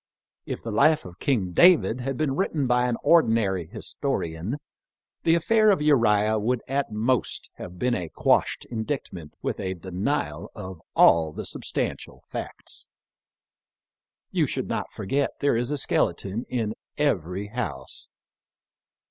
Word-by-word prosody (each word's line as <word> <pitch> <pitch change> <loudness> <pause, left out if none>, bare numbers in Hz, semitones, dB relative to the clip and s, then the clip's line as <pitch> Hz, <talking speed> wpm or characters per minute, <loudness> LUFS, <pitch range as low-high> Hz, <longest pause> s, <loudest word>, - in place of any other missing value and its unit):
If - - -5
the 115 - -4
life 155 +9 +4
of 90 -1 -11
King 105 -10 0
David 130 - +5
had 135 0 -3
been 145 -3 0
written 155 -5 0
by 125 0 +3
an 120 -2 0
ordinary 110 - +3
historian 105 - -3 0.6
the 165 - +4
affair 215 +6 +4
of 200 - +4
Uriah 110 -7 +3
would 120 +3 0
at 135 -2 -1
most 115 +4 0
have 90 0 -8
been 125 +5 +1
a 90 -8 -2
quashed - - +1
indictment 110 - -4
with - - -2
a 95 0 -2
denial 95 - -2
of 95 -6 -8
all 80 -2 +6
the - - -6
substantial - - -4
facts. - - -6 1.4
You - - +2
should - - -3
not - - -3
forget 140 +8 -1
there 140 -4 +2
is 120 +2 0
a 145 - 0
skeleton 110 -3 0
in 115 -4 -1 0.2
every 100 - 0
house. 85 - -5
115 Hz, 140 wpm, -25 LUFS, 95-140 Hz, 1.4 s, all